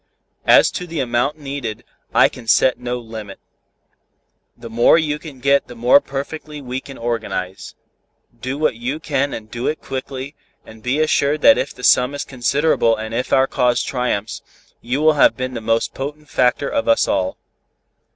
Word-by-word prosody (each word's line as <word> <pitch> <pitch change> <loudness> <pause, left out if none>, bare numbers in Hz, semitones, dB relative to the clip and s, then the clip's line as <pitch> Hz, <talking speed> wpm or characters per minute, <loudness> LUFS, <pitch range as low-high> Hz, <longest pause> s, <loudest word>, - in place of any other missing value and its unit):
As - - +6
to 180 - -5
the 165 -2 -4
amount 125 +3 0
needed, 135 -7 -5 0.3
I - - +5
can 120 -3 -12
set 130 +3 +3
no 125 0 -3
limit. 110 -4 -9 1.2
The - - -9
more 120 +7 +4
you 150 -2 -1
get 140 -2 0
the 120 - -10
more 120 +4 +5
perfectly 150 +2 -6 0.2
can 135 -1 -11
we 115 - -8
organize. 110 -5 -4 0.6
Do 130 +3 -4
what 155 -3 +1
you 125 +6 -4
can 140 -2 -1
and 110 -1 -8
do 120 +1 -3
it 155 - -1
quickly, 135 +1 -6 0.3
and 110 0 -14
be 125 +6 -1
assured 150 -1 +1
that 285 - +6
if 140 - -2
the 125 - -12
sum 125 +3 +4
is 145 - -4
considerable 130 -2 +1
and 110 +1 -6
if 125 +2 -2
our 130 - +5
cause 125 -2 +1
triumphs, 125 -5 -2 0.4
you 125 +5 -2
will 155 0 +6
have - - +5
been 130 0 -3
the 115 - -5
most 115 +1 0
potent 150 +2 -6
factor 130 +1 +1
of 115 - -1
us 115 - +3
all." 95 -1 -1
130 Hz, 175 wpm, -19 LUFS, 115-145 Hz, 1.2 s, As